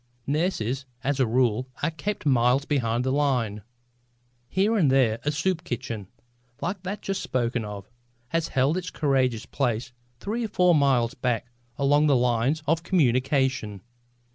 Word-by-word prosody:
Nurses 140 - -1 0.2
as 140 0 0
a 130 - +3
rule 125 +1 +1 0.2
are 165 - +2
kept 180 +4 -4
miles 130 0 +3
behind 120 -5 0
the 130 - 0
line. 125 -7 0 0.9
Here 200 +5 +2
and 170 -10 +3
there 120 -4 +3
a 150 - +1
soup 165 +3 -1
kitchen, 110 -4 -5 0.5
like 180 +1 -3
that 195 +3 -5
just 195 -1 -2
spoken 120 -2 -1
of, 105 -1 -7 0.4
has 165 +2 0
held 135 +6 +1
its 180 -1 -4
courageous 130 -8 0
place 125 -2 -2 0.3
three 225 +4 -3
or - - -1
four 180 -4 +3
miles 135 -6 +3
back 125 -1 -2 0.3
along 145 +2 +3
the 140 - +4
lines 125 +5 +1
of 165 +3 +1
communication. 130 - +1
135 Hz, 150 wpm, -26 LUFS, 120-160 Hz, 0.9 s, the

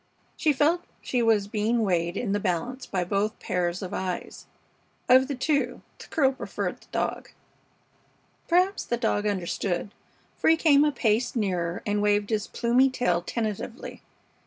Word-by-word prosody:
She 310 - +2
felt 305 +5 +2 0.2
she 250 - -1
was 220 -3 +3
being 220 +2 0
weighed 175 -3 0
in 225 -5 -2
the 205 - +1
balance 210 +8 -2
by 185 -2 -1
both 200 +4 -1
pairs 180 0 -2
of 185 - -6
eyes. 185 -2 -4 0.6
Of 260 +1 +6
the 280 - -3
two 285 +3 -1 0.2
the - - -11
girl 270 -4 +2
preferred 265 - -4
the - - -20
dog. - - -2 1.2
Perhaps 365 +3 +2
the 240 - -1
dog 215 -3 0
understood, 190 0 -2 0.5
for - - +2
he 325 - +5
came 295 -3 +5
a 300 - +3
pace 235 -1 0
nearer 180 -6 -1
and 205 0 0
waved 205 +1 +1
his 215 -1 0
plumy 245 +3 +3
tail 180 -9 0
tentatively. 220 +4 -4
220 Hz, 160 wpm, -26 LUFS, 195-260 Hz, 1.2 s, Of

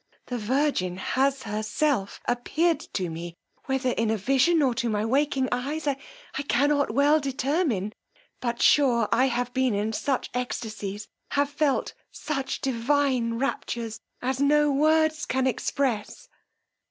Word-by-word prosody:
The 245 -1 -4
virgin 225 -6 0
has 270 +7 0
herself 215 +2 -1
appeared 305 +7 +1 0.2
to 185 -2 0
me, 170 +1 -6 0.3
whether 265 -1 0
in 230 -2 0
a 220 - +1
vision, 275 - +3
or 260 -3 +2
to 235 -1 -1
my 210 0 0
waking 270 +2 +1
eyes, 285 +6 -2
I 285 -2 +1 0.5
cannot 285 +5 +2
well 285 +6 +4
determine; 270 - -1 0.5
but 235 -2 -2
sure 245 -6 +4
I 255 - +4
have 245 -1 -2
been 260 -4 +1
in 210 +2 -1
such 265 +3 -1
extacies, 215 -4 -4 0.3
have 285 0 +1
felt 290 -1 0 0.2
such 275 -3 -4
divine 255 -1 +1
raptures, 230 -3 -3 0.2
as 260 +1 -1
no 295 +1 +4
words 310 +2 +2
can 260 0 0
express! 250 -3 -1
260 Hz, 135 wpm, -26 LUFS, 225-285 Hz, 0.5 s, well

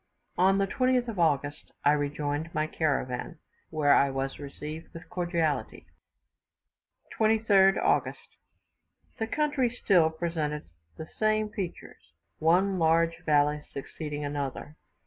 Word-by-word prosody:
On 190 +2 +4
the 195 - +2
22nd 255 +3 +1
of 210 -5 -5
August 145 -3 0
I 145 - +6
rejoined 145 +2 -2
my 155 - +1
caravan, 150 -1 -2 0.3
where 150 -3 +3
I 140 - +4
was 135 0 -3
received 150 +3 -8
with 165 0 -10
cordiality. 170 -4 -1 1.3
23rd 215 -3 +4
August. - - -1 0.8
The 225 - -1
country 290 -1 +1
still 190 -9 +3
presented 160 - -3 0.3
the 160 - -6
same 215 0 +2
features; 170 - -7 0.3
one 185 +4 +3
large 165 +1 +2
valley 150 0 +3
succeeding 145 +1 -5
another. 145 +1 -4
160 Hz, 115 wpm, -28 LUFS, 145-195 Hz, 1.3 s, I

